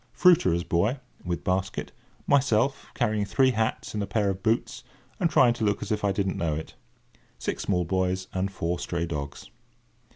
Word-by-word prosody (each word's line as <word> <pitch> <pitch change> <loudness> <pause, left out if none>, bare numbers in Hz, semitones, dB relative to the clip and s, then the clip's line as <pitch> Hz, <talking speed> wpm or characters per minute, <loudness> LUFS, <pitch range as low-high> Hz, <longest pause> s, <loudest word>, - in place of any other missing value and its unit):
Fruiterer's 95 - +4
boy, 105 +12 +1 0.2
with 85 -1 -3
basket. 95 0 -1 0.3
Myself, 135 -1 +2
carrying 110 -4 +1
three 130 +6 +3
hats 110 -2 -1
and 105 - -2
a 100 - -2
pair 100 0 +1
of 95 0 -6
boots, 110 +3 0 0.4
and 170 - +2
trying 125 -6 +5
to 115 - -4
look 105 -1 +1
as 105 - -6
if 105 -1 -1
I 100 - +3
didn't 95 -1 -1
know 80 -3 0
it. 80 - -6 0.6
Six - - -3
small 90 -3 0
boys, 95 +1 0
and 95 +1 -1
four 85 -2 -2
stray 85 -1 -2
dogs. 75 -4 -6
100 Hz, 175 wpm, -27 LUFS, 90-110 Hz, 0.6 s, trying